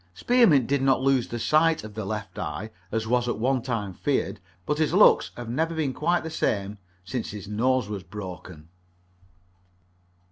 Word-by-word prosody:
Spearmint 230 Hz, -, +4 dB
did 140 Hz, +1 st, 0 dB
not 135 Hz, -1 st, +2 dB
lose 135 Hz, -3 st, +2 dB
the 120 Hz, -, -5 dB
sight 155 Hz, +5 st, +2 dB
of 110 Hz, -1 st, -9 dB
the 110 Hz, -1 st, -5 dB
left 105 Hz, +1 st, -5 dB
eye, 75 Hz, +9 st, -5 dB, 0.2 s
as 110 Hz, 0 st, -1 dB
was 120 Hz, +1 st, +1 dB
at -, -, -1 dB
one 130 Hz, +3 st, +1 dB
time 115 Hz, -6 st, -3 dB
feared, -, -, -1 dB, 0.3 s
but 150 Hz, -, -1 dB
his 160 Hz, +2 st, +1 dB
looks 210 Hz, -, +6 dB
have 120 Hz, -1 st, -6 dB
never 160 Hz, +8 st, -1 dB
been 150 Hz, -5 st, -1 dB
quite 175 Hz, +6 st, 0 dB
the 160 Hz, -, -5 dB
same 100 Hz, -6 st, -1 dB, 0.3 s
since 115 Hz, +5 st, -4 dB
his 105 Hz, -3 st, -8 dB
nose 125 Hz, +3 st, +1 dB
was 105 Hz, -2 st, -5 dB
broken. 90 Hz, -4 st, -9 dB
120 Hz, 175 wpm, -26 LUFS, 105-140 Hz, 0.3 s, looks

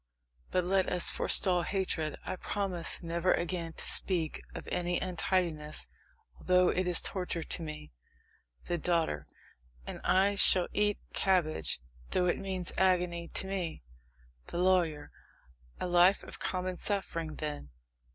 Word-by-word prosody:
But 180 Hz, -, 0 dB
let 190 Hz, +1 st, +1 dB
us 180 Hz, -1 st, +3 dB
forestall 180 Hz, -3 st, +5 dB
hatred. 175 Hz, -5 st, -2 dB
I 185 Hz, -, -4 dB
promise 185 Hz, -3 st, -2 dB
never 170 Hz, +2 st, +1 dB
again 170 Hz, -1 st, -4 dB
to -, -, -5 dB
speak 170 Hz, -5 st, +1 dB
of -, -, -8 dB
any 175 Hz, 0 st, -1 dB
untidiness 175 Hz, -4 st, -2 dB, 0.5 s
although 180 Hz, 0 st, +3 dB
it 185 Hz, 0 st, -1 dB
is 175 Hz, -2 st, +6 dB
torture 180 Hz, -3 st, -2 dB
to -, -, -3 dB
me! 155 Hz, -, -8 dB, 0.7 s
THE 175 Hz, -, -2 dB
DAUGHTER. 160 Hz, -, -1 dB, 0.6 s
And -, -, -8 dB
I 195 Hz, +2 st, +3 dB
shall 190 Hz, -2 st, +7 dB
eat 205 Hz, 0 st, +1 dB, 0.2 s
cabbage, 155 Hz, -, +2 dB, 0.3 s
though 180 Hz, -, +1 dB
it 175 Hz, -, 0 dB
means 185 Hz, -2 st, -4 dB
agony 180 Hz, -2 st, +1 dB
to -, -, -2 dB
me. 185 Hz, -, -4 dB, 0.6 s
THE -, -, -6 dB
LAWYER. 175 Hz, -5 st, +1 dB, 0.7 s
A -, -, -3 dB
life 180 Hz, +2 st, +4 dB
of -, -, -10 dB
common 185 Hz, -1 st, -3 dB
suffering, 165 Hz, -6 st, -3 dB
then! 145 Hz, -, -5 dB
180 Hz, 135 wpm, -30 LUFS, 165-185 Hz, 0.7 s, shall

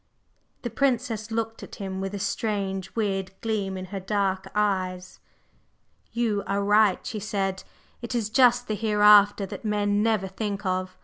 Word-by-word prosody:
The 240 Hz, -, -3 dB
Princess 235 Hz, -3 st, 0 dB
looked 225 Hz, 0 st, -3 dB
at -, -, -9 dB
him 190 Hz, -2 st, -5 dB
with 195 Hz, +1 st, -4 dB
a -, -, -3 dB
strange, 195 Hz, -2 st, -2 dB
weird 195 Hz, -3 st, -2 dB
gleam 205 Hz, -4 st, -2 dB
in 185 Hz, -, -5 dB
her 195 Hz, -, -2 dB
dark 190 Hz, -1 st, -1 dB
eyes. 185 Hz, -3 st, -1 dB, 0.9 s
"You 225 Hz, -4 st, 0 dB
are 200 Hz, +1 st, 0 dB
right," 205 Hz, -1 st, +3 dB
she 215 Hz, -, -4 dB
said. 195 Hz, -2 st, -2 dB, 0.4 s
"It 235 Hz, +1 st, -4 dB
is 220 Hz, -3 st, -1 dB
just 245 Hz, 0 st, +4 dB
the 215 Hz, -, -1 dB
Hereafter 210 Hz, -1 st, +5 dB
that 195 Hz, -, -8 dB
men 205 Hz, -1 st, +1 dB
never 215 Hz, -3 st, +1 dB
think 200 Hz, +1 st, -4 dB
of. 185 Hz, 0 st, -2 dB
205 Hz, 160 wpm, -26 LUFS, 195-220 Hz, 0.9 s, Hereafter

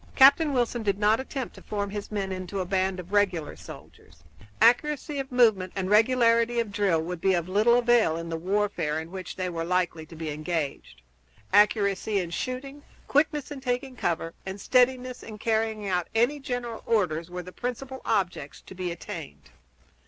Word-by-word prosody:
Captain 280 Hz, +3 st, +7 dB
Wilson 240 Hz, -2 st, 0 dB
did 200 Hz, -3 st, 0 dB
not 210 Hz, +2 st, +3 dB
attempt 265 Hz, -1 st, -5 dB
to -, -, -13 dB
form 200 Hz, -1 st, -3 dB
his 205 Hz, 0 st, -5 dB
men 195 Hz, -2 st, -2 dB
into 185 Hz, +1 st, -4 dB
a 185 Hz, -, -1 dB
band 190 Hz, 0 st, 0 dB
of 180 Hz, +3 st, -9 dB
regular 185 Hz, -7 st, +1 dB
soldiers; 80 Hz, 0 st, -14 dB, 0.4 s
accuracy 285 Hz, +5 st, +3 dB
of 270 Hz, 0 st, -5 dB
movement 220 Hz, -7 st, +3 dB
and 190 Hz, 0 st, -2 dB
regularity 230 Hz, +1 st, +4 dB
of 225 Hz, -3 st, -1 dB
drill 200 Hz, -5 st, +2 dB
would 165 Hz, +1 st, -5 dB
be 190 Hz, -1 st, +3 dB
of 170 Hz, -1 st, -2 dB
little 215 Hz, +5 st, +4 dB
avail 240 Hz, -9 st, +3 dB
in 165 Hz, 0 st, -5 dB
the 165 Hz, -, -2 dB
warfare 185 Hz, -3 st, -1 dB
in 160 Hz, +1 st, -8 dB
which 185 Hz, -2 st, -7 dB
they 185 Hz, -1 st, -2 dB
were 165 Hz, -2 st, -3 dB
likely 175 Hz, -2 st, 0 dB
to 165 Hz, +1 st, -13 dB
be 160 Hz, -1 st, -4 dB
engaged. 150 Hz, -, -4 dB, 0.5 s
Accuracy 205 Hz, 0 st, +3 dB
in 175 Hz, -2 st, -4 dB
shooting, 265 Hz, +8 st, -4 dB, 0.3 s
quickness 295 Hz, 0 st, +1 dB
in 280 Hz, -2 st, -6 dB
taking 255 Hz, +1 st, -2 dB
cover, 165 Hz, -6 st, -2 dB
and 190 Hz, +1 st, -6 dB
steadiness 255 Hz, +1 st, +2 dB
in 215 Hz, -1 st, -9 dB
carrying 220 Hz, -1 st, -1 dB
out 180 Hz, -2 st, 0 dB
any 245 Hz, +6 st, +2 dB
general 245 Hz, -4 st, -4 dB
orders 175 Hz, -7 st, +1 dB
were 180 Hz, 0 st, -6 dB
the 185 Hz, -, -10 dB
principal 255 Hz, +4 st, -5 dB
objects 180 Hz, -9 st, -1 dB
to -, -, -12 dB
be 180 Hz, -1 st, -3 dB
attained. 155 Hz, -, -8 dB
205 Hz, 180 wpm, -27 LUFS, 180-240 Hz, 0.5 s, Captain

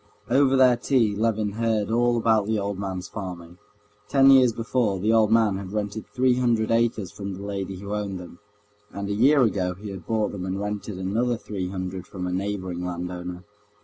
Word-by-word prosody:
Over 135 Hz, +1 st, +4 dB
their 130 Hz, -2 st, +5 dB
tea 115 Hz, -5 st, +2 dB
Levin 110 Hz, -1 st, 0 dB
heard 110 Hz, -1 st, 0 dB
all 120 Hz, +1 st, +2 dB
about 110 Hz, -3 st, +2 dB
the 110 Hz, 0 st, +1 dB
old 100 Hz, -1 st, -3 dB
man's 95 Hz, -2 st, -4 dB
farming. 90 Hz, -3 st, -8 dB, 0.5 s
Ten 135 Hz, -1 st, +6 dB
years 130 Hz, -3 st, +6 dB
before, 115 Hz, -2 st, 0 dB
the 110 Hz, +4 st, +2 dB
old 110 Hz, -2 st, +4 dB
man 110 Hz, -4 st, +3 dB
had 95 Hz, 0 st, -7 dB
rented 105 Hz, 0 st, -3 dB
three 130 Hz, -1 st, +2 dB
hundred 115 Hz, -3 st, +1 dB
acres 115 Hz, -5 st, +1 dB
from 100 Hz, -1 st, -6 dB
the 100 Hz, -, -8 dB
lady 100 Hz, -1 st, -4 dB
who 100 Hz, +2 st, -6 dB
owned 100 Hz, -3 st, -3 dB
them, 85 Hz, -1 st, -11 dB, 0.5 s
and 100 Hz, 0 st, -5 dB
a -, -, 0 dB
year 135 Hz, +6 st, +5 dB
ago 95 Hz, -5 st, 0 dB
he 100 Hz, +2 st, -8 dB
had 95 Hz, -4 st, -9 dB
bought 110 Hz, -2 st, 0 dB
them 95 Hz, -3 st, -6 dB
and 95 Hz, +1 st, -3 dB
rented 105 Hz, -1 st, -4 dB
another 115 Hz, +6 st, 0 dB
three 95 Hz, -5 st, -5 dB
hundred 95 Hz, -1 st, -5 dB
from 90 Hz, -2 st, -6 dB
a 90 Hz, -, -2 dB
neighboring 95 Hz, -2 st, -3 dB
landowner. 90 Hz, 0 st, -5 dB
105 Hz, 195 wpm, -25 LUFS, 95-115 Hz, 0.5 s, Ten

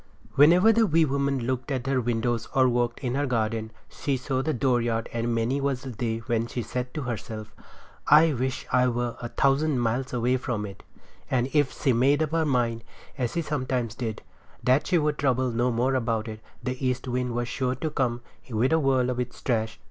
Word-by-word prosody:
Whenever 175 Hz, +10 st, +6 dB
the 225 Hz, 0 st, +3 dB
wee 165 Hz, -1 st, +4 dB
woman 140 Hz, -1 st, 0 dB
looked 130 Hz, +1 st, -2 dB
from 130 Hz, -3 st, -1 dB
her 135 Hz, -1 st, +1 dB
windows 120 Hz, 0 st, -1 dB
or 130 Hz, -1 st, +5 dB
walked 120 Hz, -1 st, 0 dB
in 125 Hz, -3 st, -2 dB
her 145 Hz, +1 st, 0 dB
garden 110 Hz, -2 st, -1 dB, 0.2 s
she 140 Hz, -2 st, -2 dB
saw 130 Hz, 0 st, -1 dB
the 155 Hz, -, -1 dB
dooryard 120 Hz, -4 st, 0 dB
and 115 Hz, 0 st, -1 dB
many 120 Hz, +5 st, 0 dB
was 135 Hz, -2 st, -1 dB
the 130 Hz, -, -6 dB
day 115 Hz, 0 st, -2 dB
when 115 Hz, -2 st, 0 dB
she 120 Hz, 0 st, -4 dB
said 125 Hz, +3 st, -4 dB
to 150 Hz, -, -4 dB
herself: 110 Hz, -3 st, -6 dB, 0.5 s
"I 155 Hz, +2 st, +6 dB
wish 130 Hz, 0 st, -2 dB
I 125 Hz, 0 st, +4 dB
were 120 Hz, -1 st, -1 dB
a 120 Hz, -, -3 dB
thousand 140 Hz, +2 st, +2 dB
miles 120 Hz, +3 st, -1 dB
away 125 Hz, +1 st, +1 dB
from 120 Hz, -5 st, -3 dB
it;" 100 Hz, -1 st, -9 dB, 0.5 s
and 130 Hz, +1 st, 0 dB
if 145 Hz, -3 st, +1 dB
she 130 Hz, -, +2 dB
made 140 Hz, +6 st, +3 dB
up 155 Hz, -, -3 dB
her 165 Hz, -1 st, +1 dB
mind, 120 Hz, -4 st, 0 dB, 0.3 s
as 125 Hz, -4 st, -2 dB
sometimes 130 Hz, -6 st, -2 dB
she -, -, -22 dB
did, 110 Hz, -2 st, -4 dB, 0.4 s
that 130 Hz, +3 st, +3 dB
she 180 Hz, -, +3 dB
would 150 Hz, -2 st, 0 dB
trouble 130 Hz, -2 st, +1 dB
no 120 Hz, +2 st, +1 dB
more 125 Hz, +3 st, +1 dB
about 115 Hz, -3 st, 0 dB
it, 110 Hz, -1 st, -6 dB, 0.2 s
the 130 Hz, +1 st, -4 dB
east 125 Hz, 0 st, -1 dB
wind 125 Hz, -1 st, -1 dB
was 120 Hz, 0 st, -1 dB
sure 130 Hz, +1 st, -1 dB
to 155 Hz, +4 st, -3 dB
come 120 Hz, -4 st, -1 dB, 0.3 s
with 120 Hz, +5 st, +1 dB
a 160 Hz, -, +4 dB
whirl 130 Hz, -3 st, +2 dB
of 125 Hz, -, -3 dB
its 125 Hz, 0 st, -4 dB
trash. 110 Hz, -3 st, -1 dB
125 Hz, 210 wpm, -26 LUFS, 120-135 Hz, 0.5 s, Whenever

